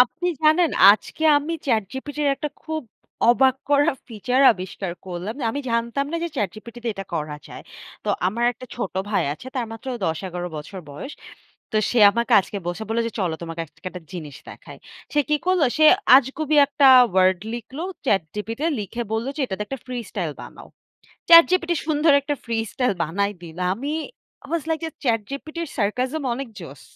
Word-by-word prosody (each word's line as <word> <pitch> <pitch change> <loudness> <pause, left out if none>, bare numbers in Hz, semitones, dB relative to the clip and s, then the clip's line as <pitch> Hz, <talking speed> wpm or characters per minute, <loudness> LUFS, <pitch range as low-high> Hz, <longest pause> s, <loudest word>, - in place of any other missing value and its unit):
আপনি 325 +8 +2 0.2
জানেন 315 +1 +4 0.2
আজকে 215 +9 -6
আমি 295 +3 -1
ChatGPT-র 265 +6 -1
একটা 300 - -3
খুব 315 -1 -4 0.5
অবাক 260 +2 +4 0.2
করা 285 0 +4 0.2
feature 250 +4 0
আবিষ্কার 185 -1 -6
করলাম। 185 +5 -5 0.2
আমি 285 - -3
জানতাম 235 +4 -1
না 335 - 0
যে - - -2
ChatGPT-তে 235 +3 -4
এটা 195 0 -6
করা 150 -2 -3
যায়। - - -10 0.4
তো - - -4 0.2
আমার 225 +6 -1
একটা 255 +2 -12
ছোট 220 -7 -4 0.2
ভাই 210 - +2
আছে 155 - -11
তার 240 -3 -1
মাত্র 225 +3 -11 0.2
১০-১১ 180 +1 -3
বছর 155 +6 -8
বয়স। 150 - -8 0.6
তো - - 0
সে 245 - +1
আমাকে 235 +3 -1
আজকে 200 - -8
বসে 175 +5 -3
বলল 225 +1 -1
যে - - -11
চলো 175 -4 0
তোমাকে 165 0 -6
আজকে 170 - -17
একটা 180 -2 -9
জিনিস 155 -6 -7
দেখাই। - - -11 0.4
সে 295 - +3
কী 300 - +3
করল? 370 -1 +3 0.2
সে 310 - +5 0.3
আজগুবি 295 +3 +1
একটা 280 -1 +3 0.3
word 185 -1 +4 0.2
লিখল 240 +4 -8 0.3
ChatGPT-তে 210 - -1
লিখে 210 +4 -4
বলল 225 +2 -1
যে - - -4
এটাতে 200 -2 -4
একটা 270 +5 -5
freestyle 215 -10 -4
বানাও। - - -12 0.6
ChatGPT 340 +1 +7 0.2
সুন্দর 310 0 +3
একটা 290 +1 -2
freestyle 230 0 -1
বানায় 200 +6 -1
দিল 165 -1 -10 0.2
আমি 275 +9 -4 0.5
I - - -14
was 335 -3 0
like 320 0 -1
যে - - -3
ChatGPT-র 275 +8 -2
sarcasm 250 +8 -1
অনেক 265 +1 -5
জোস। 140 -4 -10
235 Hz, 165 wpm, -23 LUFS, 195-285 Hz, 0.6 s, ChatGPT